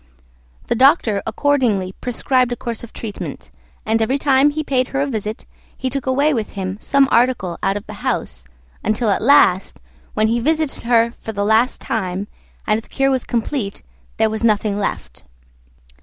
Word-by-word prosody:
The -, -, 0 dB
Doctor 235 Hz, -, +4 dB
accordingly 235 Hz, -10 st, +1 dB
prescribed 250 Hz, +1 st, +1 dB
a -, -, 0 dB
course 235 Hz, -1 st, -6 dB
of 235 Hz, -, -9 dB
treatment, 215 Hz, -3 st, -7 dB, 0.3 s
and 225 Hz, +1 st, +1 dB
every 255 Hz, +5 st, +1 dB
time 275 Hz, 0 st, +4 dB
he 310 Hz, +1 st, -3 dB
paid 255 Hz, -3 st, 0 dB
her 275 Hz, -, -2 dB
a -, -, +2 dB
visit 220 Hz, -5 st, -4 dB, 0.3 s
he 260 Hz, -1 st, -3 dB
took 275 Hz, -1 st, -4 dB
away 280 Hz, +4 st, +2 dB
with 225 Hz, -5 st, -3 dB
him 190 Hz, 0 st, -4 dB
some 275 Hz, -1 st, +3 dB
article 235 Hz, -8 st, +2 dB
out 195 Hz, +1 st, +1 dB
of 205 Hz, -, -8 dB
the -, -, -9 dB
house, 60 Hz, -1 st, -2 dB, 0.4 s
until 215 Hz, +1 st, +1 dB
at -, -, 0 dB
last, 225 Hz, -8 st, +4 dB, 0.4 s
when 215 Hz, -, +2 dB
he 230 Hz, +2 st, +1 dB
visited 310 Hz, 0 st, -1 dB
her 235 Hz, -1 st, +3 dB
for 220 Hz, -, -6 dB
the 200 Hz, 0 st, -1 dB
last 220 Hz, +4 st, +2 dB
time, 195 Hz, -2 st, -3 dB, 0.4 s
and 215 Hz, +1 st, +1 dB
the -, -, -23 dB
cure 270 Hz, 0 st, +1 dB
was 260 Hz, -2 st, 0 dB
complete, 230 Hz, -3 st, -3 dB, 0.3 s
there 220 Hz, -1 st, +2 dB
was 220 Hz, +1 st, -4 dB
nothing 215 Hz, -2 st, +2 dB
left. 70 Hz, -, -4 dB
230 Hz, 175 wpm, -19 LUFS, 210-265 Hz, 0.4 s, Doctor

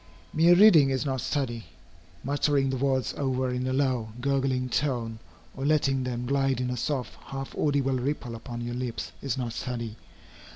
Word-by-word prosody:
Mere 170 Hz, +3 st, +6 dB
reading 175 Hz, -8 st, +7 dB
is 135 Hz, +2 st, 0 dB
not 130 Hz, -3 st, -1 dB
study. 120 Hz, -5 st, -2 dB, 0.6 s
Muttering 140 Hz, 0 st, +1 dB
the -, -, -1 dB
words 130 Hz, -2 st, 0 dB
over 130 Hz, -2 st, 0 dB
in 125 Hz, +1 st, -2 dB
a -, -, 0 dB
low, 130 Hz, -4 st, +1 dB
gurgling 135 Hz, -1 st, 0 dB
tone, 120 Hz, -4 st, -1 dB, 0.4 s
or 135 Hz, -, -5 dB
letting 140 Hz, -3 st, +2 dB
them 125 Hz, -1 st, -3 dB
glide 135 Hz, 0 st, +1 dB
in 125 Hz, 0 st, -1 dB
a -, -, -1 dB
soft, 130 Hz, 0 st, -2 dB
half 135 Hz, 0 st, -6 dB
audible 135 Hz, -3 st, +1 dB
ripple 125 Hz, -2 st, -2 dB
upon 120 Hz, +1 st, -6 dB
your 120 Hz, 0 st, -4 dB
lips, 125 Hz, -1 st, -4 dB
is 135 Hz, -3 st, -2 dB
not 120 Hz, -3 st, -3 dB
study. 115 Hz, -3 st, -4 dB
130 Hz, 170 wpm, -27 LUFS, 125-140 Hz, 0.6 s, reading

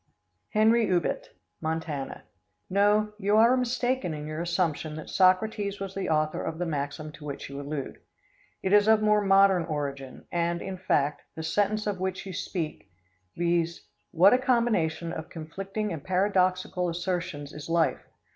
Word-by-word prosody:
Henry 220 Hz, +1 st, +4 dB
Ubet, 175 Hz, -2 st, 0 dB, 0.3 s
Montana. 160 Hz, -3 st, -3 dB, 0.5 s
No, 210 Hz, +2 st, +3 dB
you 205 Hz, +1 st, +2 dB
are 230 Hz, +3 st, +6 dB
mistaken 250 Hz, -7 st, 0 dB
in 150 Hz, 0 st, -6 dB
your 155 Hz, +1 st, -4 dB
assumption 170 Hz, -3 st, -1 dB
that 155 Hz, -, -8 dB
Socrates 200 Hz, +2 st, +2 dB
was 195 Hz, -1 st, -5 dB
the 195 Hz, -, -3 dB
author 155 Hz, -1 st, +1 dB
of 160 Hz, -, -4 dB
the 180 Hz, -, -2 dB
maxim 150 Hz, 0 st, -3 dB
to 150 Hz, -, -13 dB
which 140 Hz, -1 st, -6 dB
you 140 Hz, +1 st, -5 dB
allude. 145 Hz, -1 st, -5 dB, 0.6 s
It 190 Hz, -, +1 dB
is 205 Hz, 0 st, +6 dB
of 220 Hz, -1 st, +5 dB
more 210 Hz, 0 st, +4 dB
modern 195 Hz, -2 st, +5 dB
origin, 140 Hz, -4 st, -5 dB
and, 170 Hz, 0 st, 0 dB
in 190 Hz, +1 st, -5 dB
fact, 150 Hz, -5 st, +1 dB
the 160 Hz, -, -5 dB
sentence 205 Hz, +5 st, 0 dB
of 205 Hz, -3 st, -2 dB
which 190 Hz, +1 st, -3 dB
you 190 Hz, -, -6 dB
speak, 165 Hz, -, -4 dB, 0.5 s
viz: 170 Hz, 0 st, 0 dB, 0.3 s
"What 190 Hz, +6 st, +6 dB
a 250 Hz, -, +4 dB
combination 210 Hz, -, +1 dB
of 160 Hz, -, -6 dB
conflicting 195 Hz, +5 st, -4 dB
and 155 Hz, -3 st, -6 dB
paradoxical 185 Hz, -1 st, +1 dB
assertions 170 Hz, -4 st, -3 dB
is 150 Hz, +1 st, -8 dB
life? 165 Hz, -1 st, +2 dB
180 Hz, 155 wpm, -27 LUFS, 160-205 Hz, 0.6 s, are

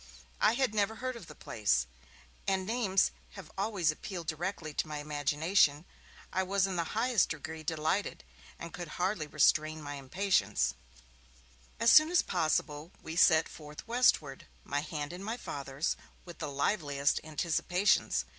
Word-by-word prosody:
I 215 Hz, -, +4 dB
had 260 Hz, -3 st, +1 dB
never 210 Hz, +1 st, +1 dB
heard 255 Hz, +2 st, -4 dB
of 215 Hz, -8 st, -10 dB
the 150 Hz, -, -11 dB
place, 65 Hz, -, 0 dB, 0.6 s
and 190 Hz, -1 st, +1 dB
names 210 Hz, -4 st, +2 dB, 0.2 s
have 190 Hz, -6 st, -11 dB
always 195 Hz, -5 st, +1 dB
appealed 175 Hz, +2 st, -7 dB
directly 160 Hz, 0 st, -4 dB
to 155 Hz, -, -1 dB
my 150 Hz, -1 st, -5 dB
imagination. 150 Hz, +2 st, +1 dB, 0.5 s
I 190 Hz, -, +2 dB
was 195 Hz, +1 st, +1 dB
in 190 Hz, -1 st, -3 dB
the 170 Hz, -, +1 dB
highest 235 Hz, -2 st, +3 dB
degree 160 Hz, 0 st, -6 dB
delighted, 155 Hz, -, -1 dB, 0.3 s
and 170 Hz, -, -8 dB
could 175 Hz, -1 st, -6 dB
hardly 180 Hz, -3 st, -1 dB
restrain 155 Hz, +1 st, +2 dB
my 145 Hz, -1 st, -6 dB
impatience. 140 Hz, -, +1 dB, 1.1 s
As 230 Hz, +1 st, +5 dB
soon 310 Hz, +1 st, +8 dB
as 355 Hz, -1 st, +3 dB
possible 155 Hz, -2 st, -1 dB
we 160 Hz, -, -6 dB
set 160 Hz, -2 st, +5 dB
forth 150 Hz, +3 st, -11 dB
westward, 230 Hz, -, +2 dB, 0.2 s
my 145 Hz, -, -1 dB
hand 150 Hz, +1 st, -5 dB
in 180 Hz, -, -7 dB
my 225 Hz, +4 st, -3 dB
Father's, 140 Hz, -, -3 dB, 0.3 s
with 175 Hz, -1 st, -11 dB
the -, -, -3 dB
liveliest 140 Hz, -1 st, 0 dB
anticipations. 170 Hz, +5 st, +1 dB
165 Hz, 150 wpm, -31 LUFS, 150-195 Hz, 1.1 s, soon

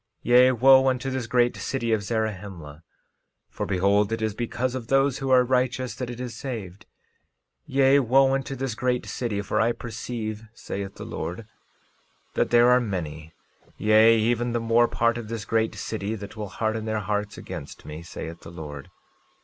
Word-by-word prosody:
13:12 -, -, -4 dB
Yea, 125 Hz, +1 st, +7 dB
wo 130 Hz, +2 st, +6 dB
unto 130 Hz, +1 st, 0 dB
this 130 Hz, -3 st, -3 dB
great 120 Hz, 0 st, +2 dB
city 120 Hz, -4 st, -2 dB
of 110 Hz, -, +1 dB
Zarahemla; 100 Hz, -8 st, -4 dB, 0.7 s
for -, -, -4 dB
behold, 100 Hz, +2 st, +2 dB
it 115 Hz, -, -1 dB
is 110 Hz, -1 st, -1 dB
because 120 Hz, +3 st, -2 dB
of 125 Hz, -3 st, -5 dB
those 135 Hz, 0 st, +2 dB
who 135 Hz, -, -3 dB
are 130 Hz, -1 st, +6 dB
righteous 125 Hz, 0 st, 0 dB
that 120 Hz, +1 st, -5 dB
it 120 Hz, 0 st, -7 dB
is 125 Hz, -2 st, -5 dB
saved; 110 Hz, -8 st, -7 dB, 0.8 s
yea, 135 Hz, +1 st, +4 dB
wo 135 Hz, +1 st, +4 dB
unto 135 Hz, 0 st, -2 dB
this 135 Hz, -2 st, -3 dB
great 125 Hz, +1 st, -1 dB
city, 105 Hz, -5 st, -3 dB
for -, -, 0 dB
I 115 Hz, +1 st, +2 dB
perceive, 110 Hz, -2 st, -5 dB
saith 100 Hz, -3 st, -6 dB
the -, -, -8 dB
Lord, 90 Hz, +6 st, -5 dB, 0.9 s
that -, -, +1 dB
there 120 Hz, +1 st, +6 dB
are 125 Hz, 0 st, +5 dB
many, 80 Hz, -7 st, -5 dB, 0.4 s
yea, 110 Hz, +2 st, +5 dB
even 120 Hz, +2 st, +1 dB
the 120 Hz, -, +1 dB
more 115 Hz, +1 st, +3 dB
part 115 Hz, 0 st, +1 dB
of 115 Hz, -, -7 dB
this 115 Hz, -1 st, -5 dB
great 110 Hz, 0 st, 0 dB
city, 110 Hz, 0 st, -3 dB
that 100 Hz, +1 st, -9 dB
will 105 Hz, -2 st, -5 dB
harden 110 Hz, +2 st, -2 dB
their 110 Hz, -1 st, -1 dB
hearts 105 Hz, +1 st, -2 dB
against 85 Hz, -6 st, -8 dB
me, 75 Hz, +1 st, -7 dB
saith 85 Hz, -1 st, -8 dB
the -, -, -10 dB
Lord. 75 Hz, -4 st, -8 dB
115 Hz, 180 wpm, -25 LUFS, 100-125 Hz, 0.9 s, Yea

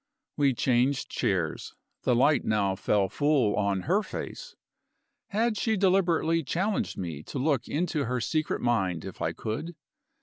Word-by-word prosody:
We 140 Hz, -3 st, +2 dB
changed 125 Hz, +3 st, +1 dB
chairs; -, -, -1 dB, 0.3 s
the 125 Hz, -, +3 dB
light 140 Hz, +4 st, +4 dB
now 100 Hz, -3 st, +1 dB
fell 100 Hz, 0 st, +1 dB
full 140 Hz, -4 st, +2 dB
on 100 Hz, -2 st, 0 dB
her 190 Hz, -, +2 dB
face. -, -, -7 dB, 0.7 s
Had 225 Hz, +1 st, 0 dB
she 220 Hz, 0 st, +1 dB
deliberately 175 Hz, -4 st, +2 dB
challenged 185 Hz, +8 st, -1 dB
me 85 Hz, -6 st, -4 dB
to 105 Hz, -, -7 dB
look 135 Hz, -2 st, 0 dB
into 155 Hz, -2 st, -1 dB
her 125 Hz, +2 st, -1 dB
secret 155 Hz, +6 st, -1 dB
mind 95 Hz, -9 st, 0 dB
if -, -, -9 dB
I -, -, 0 dB
could? 160 Hz, +11 st, -5 dB
140 Hz, 145 wpm, -28 LUFS, 110-170 Hz, 0.7 s, light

